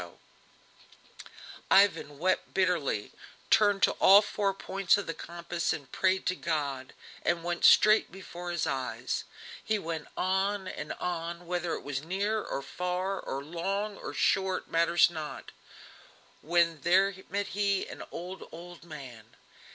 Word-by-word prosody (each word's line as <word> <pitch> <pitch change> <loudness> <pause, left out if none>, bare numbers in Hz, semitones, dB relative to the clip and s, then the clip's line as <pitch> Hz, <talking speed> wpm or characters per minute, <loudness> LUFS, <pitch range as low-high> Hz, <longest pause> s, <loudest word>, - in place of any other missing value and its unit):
] - - -16
Ivan 175 -7 +4
wept 185 +5 0
bitterly, 175 - 0 0.4
turned 205 -2 +4
to - - +6
all 200 +2 +7
four 205 -1 0
points 195 -1 +1
of 205 - -3
the 165 - -3
compass 170 +1 -3
and 140 -4 -8
prayed 190 0 +1
to 185 - +1
God, 140 -7 -3 0.3
and 170 -1 0
went 175 0 -3
straight 215 +1 +6
before 180 -1 -8
his 175 -2 -1
eyes. 125 -3 -3 0.4
He 215 - 0
went 165 -5 -5
on 190 +1 0
and 150 -4 -5
on, 170 0 -4
whether 175 -1 -2
it - - -8
was 140 -1 -3
near 200 +6 -1
or 140 - -4
far, 180 +5 -2
or 135 +1 -5
long 195 +7 -3
or - - -6
short, 190 -1 +1
matters 170 +1 +4
not; 155 -3 -7 0.9
when 170 -1 +2
there 190 +3 +4 0.2
met 200 +1 -2
him 200 -1 0
an - - -8
old, 180 +2 -7
old 175 +1 -11
man. 125 -8 -11
175 Hz, 145 wpm, -29 LUFS, 160-195 Hz, 0.9 s, all